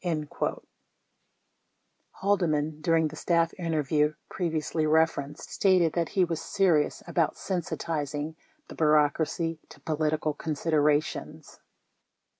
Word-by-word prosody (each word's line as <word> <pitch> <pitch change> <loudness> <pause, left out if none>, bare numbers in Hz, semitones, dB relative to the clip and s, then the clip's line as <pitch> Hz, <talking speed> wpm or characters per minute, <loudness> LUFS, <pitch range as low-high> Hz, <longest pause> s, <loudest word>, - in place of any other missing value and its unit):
34 155 -4 -2 1.6
Haldeman, 160 -6 +1
during 160 -1 +2
the 155 - -10
staff 165 0 +1
interview 155 -2 +1 0.2
previously 160 -2 -1
referenced, 155 -2 +1
stated 185 -5 +3
that 170 -2 0
he 185 -2 +2
was 165 -2 -3
"serious" 175 -7 +1
about 165 -3 0
sensitizing 155 -4 -3 0.3
the - - -10
bureaucracy 155 +2 +2
to - - -14
polit 155 0 0
ical 155 -1 -2
considerations. 150 -1 -1
160 Hz, 100 wpm, -28 LUFS, 150-170 Hz, 1.6 s, stated